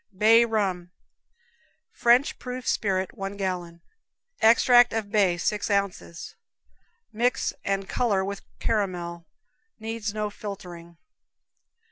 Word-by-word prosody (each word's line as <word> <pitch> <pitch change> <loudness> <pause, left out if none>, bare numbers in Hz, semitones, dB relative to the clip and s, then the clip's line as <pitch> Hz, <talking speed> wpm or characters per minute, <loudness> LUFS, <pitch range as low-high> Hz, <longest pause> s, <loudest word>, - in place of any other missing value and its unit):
Bay 225 +3 +6
Rum. 195 -6 -1 1.0
French 240 +4 +3
proof 250 0 -6
spirit, 190 -3 0
one 195 +1 -5
gallon; 175 -3 -4 0.6
extract 240 +2 +6 0.2
bay, 195 -5 +3
six 210 +5 -1
ounces. 200 -4 -2 0.8
Mix 235 +2 0
and 195 0 -2
color 205 -6 0
with 200 0 -5 0.2
caramel; 175 -5 -2 0.5
needs 220 -1 -4
no 210 0 -3
filtering. 175 -5 -9
200 Hz, 95 wpm, -25 LUFS, 185-225 Hz, 1.0 s, Bay